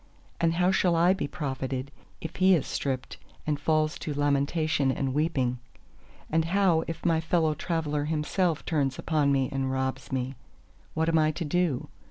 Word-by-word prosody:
And 165 0 +2
how 180 +2 +3
shall 180 -2 +2
I 175 +3 +5
be 190 - -3
profited, 135 -2 -4 0.3
if 160 - -6
he 185 0 +6
is 155 - 0
stripped 130 -2 -3 0.3
and 150 -2 -1
falls 155 0 +1
to 150 - -4
lamentation 145 0 +1
and 135 0 -2
weeping? 135 -5 0 0.7
And 160 0 +1
how 175 -2 +3
if 165 - -6
my 165 -2 +3
fellow 160 -1 +2
traveller 150 -2 -2
himself 160 +2 0
turns 140 -5 0
upon 150 -3 +1
me 135 -2 +2
and 135 -1 -1
robs 130 0 -2
me? 130 0 -2 0.6
What 160 +1 +1
am 165 -1 +3
I 155 0 +3
to 165 - -4
do? 160 -4 0
155 Hz, 170 wpm, -27 LUFS, 135-165 Hz, 0.7 s, he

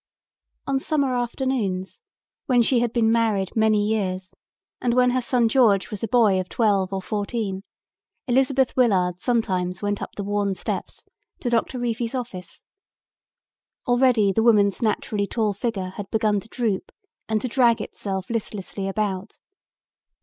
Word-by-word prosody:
On 275 -1 0
summer 280 -3 0
afternoons, 240 - -2 0.5
when 245 -2 +4
she 245 +1 +2
had 240 -1 0
been 230 -2 +2
married 220 -5 +1
many 215 -2 +3
years 190 -3 -2 0.5
and 240 -1 +1
when 250 0 +4
her 255 +1 +1
son 240 -1 +2
George 215 -7 +3
was 210 -1 -5
a - - 0
boy 215 -4 +4
of 185 -1 -4
twelve 200 -5 +1
or 190 -1 -3
fourteen, 205 -2 -3 0.6
Elizabeth 265 +1 +2
Willard 185 -8 +2
sometimes 185 -6 0
went 205 0 -1
up - - -7
the 200 - -4
worn 200 -1 -1
steps - - -5 0.4
to 245 - -2
Doctor 235 +2 0
Reefy's 235 0 -2
office. 230 -8 -6 1.2
Already 245 -5 +4
the 225 - +1
woman's 210 -3 +4
naturally 210 -2 0
tall 215 -2 0
figure 200 -3 -3
had 200 -1 -6
begun 215 -2 +1
to 210 - -13
droop 225 -6 -2 0.4
and 220 -1 +1
to 255 - -3
drag 235 -2 +3
itself 190 -2 -4
listlessly 200 -3 -4
about. 195 -1 -3
220 Hz, 150 wpm, -23 LUFS, 195-240 Hz, 1.2 s, when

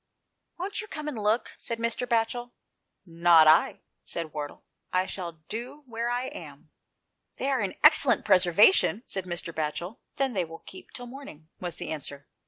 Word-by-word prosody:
"Won't 385 +4 -3
you 425 - -9
come 305 -6 -6
and 300 - -3
look?" 215 +3 +1
said 230 - -4
Mr. 230 +2 -2
Batchel. 240 +1 0 0.5
"Not 170 -2 +5
I," 155 +1 +4 0.2
said 165 -3 -6
Wardle, 145 -1 -6 0.3
"I 185 0 +2
shall 180 -3 -6
do 245 +7 -6
where 235 -1 -3
I 245 +1 -1
am." - - -11 0.3
" - - -54
They 275 - -1
are 260 -4 +1
in 195 -2 -2
excellent 290 -6 +6
preservation," 200 - +5
said 190 -2 -5
Mr. 175 -1 -5
Batchel. 160 +6 -4
" - - -53
Then 270 -2 0
they 190 -4 +1
will 165 0 -10
keep 370 - -12
till 245 - -8
morning," 240 - -11
was 175 -2 -5
the - - -6
answer. 145 -2 -5
210 Hz, 180 wpm, -27 LUFS, 170-245 Hz, 0.5 s, excellent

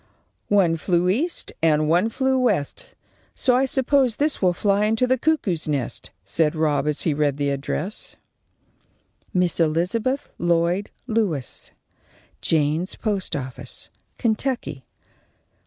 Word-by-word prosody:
"One 185 -5 +3
flew 175 +1 +1
east 295 - 0
and 155 -1 +3
one 175 +8 +3
flew 265 +2 +1
west, 250 - -1 0.4
so 250 -2 +3
I 260 +2 +3
s'pose 265 -2 +2
this 295 +4 0
will 185 -2 +4
fly 200 +3 +1
into 225 +3 +2
the 255 +1 +3
cuckoo's 240 - 0
nest," 140 -5 -2 0.2
said 150 - +1
Rob, 150 -3 +1
as 150 -1 0
he 160 - +2
read 145 -1 +1
the 145 -1 0
address: 145 +8 -4 1.2
_Miss 180 -2 +2
Elizabeth 180 - 0
Lloyd 175 +3 +1 0.2
Lewis, 210 - -1 0.7
Jaynes's 160 +3 +1
Post 205 -4 -2
office, 130 -3 -7 0.3
Kentucky. 220 - -1
180 Hz, 125 wpm, -23 LUFS, 155-235 Hz, 1.2 s, will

